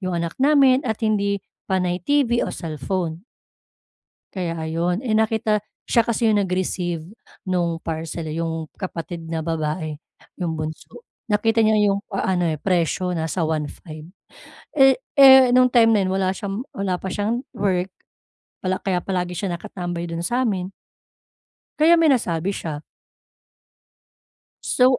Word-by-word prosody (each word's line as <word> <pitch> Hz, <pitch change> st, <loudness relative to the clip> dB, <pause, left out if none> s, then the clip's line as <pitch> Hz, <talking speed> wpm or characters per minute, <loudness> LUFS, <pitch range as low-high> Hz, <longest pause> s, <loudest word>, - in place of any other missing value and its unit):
'yong 185 Hz, -2 st, -2 dB
anak 170 Hz, -1 st, -4 dB
namin 275 Hz, -2 st, +5 dB
at 220 Hz, -2 st, -1 dB
hindi 200 Hz, -2 st, +1 dB, 0.3 s
panay 180 Hz, -2 st, 0 dB
TV 255 Hz, -2 st, +2 dB
o -, -, -3 dB
cellphone." 165 Hz, +2 st, -4 dB, 1.1 s
Kaya 170 Hz, -3 st, -3 dB
ayon, 165 Hz, +5 st, -1 dB
eh 215 Hz, -, +1 dB
nakita 220 Hz, -1 st, +1 dB, 0.2 s
siya 235 Hz, -, +4 dB
kasi 235 Hz, 0 st, 0 dB
'yong 210 Hz, -2 st, +3 dB
nag-receive 180 Hz, -3 st, -2 dB, 0.4 s
no'ng 170 Hz, -3 st, 0 dB
parcel, 165 Hz, 0 st, -5 dB
'yong 160 Hz, 0 st, -3 dB
kapatid 175 Hz, -2 st, -6 dB
na 165 Hz, -, -2 dB
babae 155 Hz, -1 st, -2 dB, 0.5 s
'yong 170 Hz, -2 st, -1 dB
bunso 155 Hz, -, -7 dB, 0.2 s
nakita 225 Hz, +1 st, +1 dB
niya 220 Hz, -1 st, +4 dB, 0.2 s
'yong 195 Hz, -, +1 dB, 0.2 s
a 190 Hz, -1 st, 0 dB
ano 170 Hz, -3 st, +1 dB
presyo 180 Hz, 0 st, 0 dB
nasa 165 Hz, 0 st, -2 dB
1500 155 Hz, 0 st, -4 dB, 0.7 s
eh, 270 Hz, -2 st, +6 dB, 0.2 s
eh, 265 Hz, -2 st, +9 dB
no'ng 255 Hz, -1 st, +5 dB
time 230 Hz, -2 st, +5 dB
na -, -, +3 dB
'yon 185 Hz, -, -1 dB
wala 190 Hz, 0 st, +1 dB
siyang 200 Hz, +4 st, -4 dB
wala 195 Hz, -2 st, -1 dB
pa -, -, -6 dB
siyang 220 Hz, +6 st, -1 dB
work 190 Hz, -3 st, 0 dB, 0.7 s
pala 185 Hz, 0 st, 0 dB
kaya 190 Hz, -2 st, 0 dB
palagi 180 Hz, -2 st, -2 dB
siya 195 Hz, -, -2 dB
nakatambay 175 Hz, -3 st, -5 dB
do'n 165 Hz, 0 st, -4 dB
sa 245 Hz, +8 st, 0 dB
amin. 185 Hz, -3 st, -2 dB, 1.1 s
Kaya 320 Hz, +3 st, +6 dB
may 330 Hz, -2 st, +5 dB
nasabi 180 Hz, -, +1 dB
siya. 155 Hz, -6 st, -4 dB, 1.8 s
So, 255 Hz, 0 st, +3 dB
185 Hz, 140 wpm, -22 LUFS, 165-220 Hz, 1.8 s, eh